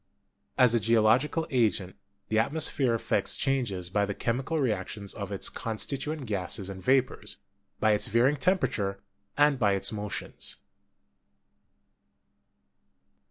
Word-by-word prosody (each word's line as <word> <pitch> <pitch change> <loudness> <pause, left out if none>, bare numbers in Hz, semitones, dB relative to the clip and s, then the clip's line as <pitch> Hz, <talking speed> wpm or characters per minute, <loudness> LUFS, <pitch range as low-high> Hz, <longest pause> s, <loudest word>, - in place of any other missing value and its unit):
As 125 -2 +5
a 120 - +3
geological 115 +8 +3
agent, 105 -7 +1 0.3
the 110 - +1
atmos 150 +8 +2
phere 130 -5 +1
effects 100 -3 +1
changes 115 -11 -1
by 105 +1 +2
the 100 -1 -2
chemical 130 +7 -1
reactions 105 -6 -2
of 100 -2 -6
its 100 - 0
constituent 140 +6 -3
gases 100 -2 -3
and 95 -1 -8
vapors, 125 -2 +1 0.4
by 110 - +3
its 105 +2 +2
varying 120 +6 +3
temperature, 105 - 0 0.4
and 145 -2 +4
by 100 -3 +3
its 95 - +1
motions. 105 -2 -5
110 Hz, 120 wpm, -28 LUFS, 100-135 Hz, 0.4 s, As